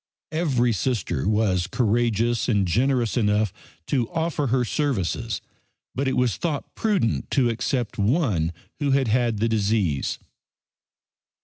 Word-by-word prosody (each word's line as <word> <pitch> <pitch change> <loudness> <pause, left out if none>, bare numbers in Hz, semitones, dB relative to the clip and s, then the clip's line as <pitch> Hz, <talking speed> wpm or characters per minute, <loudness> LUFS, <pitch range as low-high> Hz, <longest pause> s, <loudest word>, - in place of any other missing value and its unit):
Every 135 -8 +1
Sister 100 - -1
was 100 -5 +1
courageous 115 +1 +1
and 100 -5 +2
generous 120 +5 +1
enough 105 -3 +2 0.3
to 120 -1 0
offer 160 -3 -1
her 125 0 +1
services, 115 - -1 0.5
but 135 +1 -1
it 130 - 0
was 125 -2 +1
thought 155 -5 -3
prudent 195 - 0
to 125 -4 +2
accept 120 0 -2
one 105 - +1 0.3
who 145 -2 0
had 135 -3 +2
had 120 -1 +2
the 110 +3 +1
disease. 105 -9 0
120 Hz, 125 wpm, -24 LUFS, 105-135 Hz, 0.5 s, and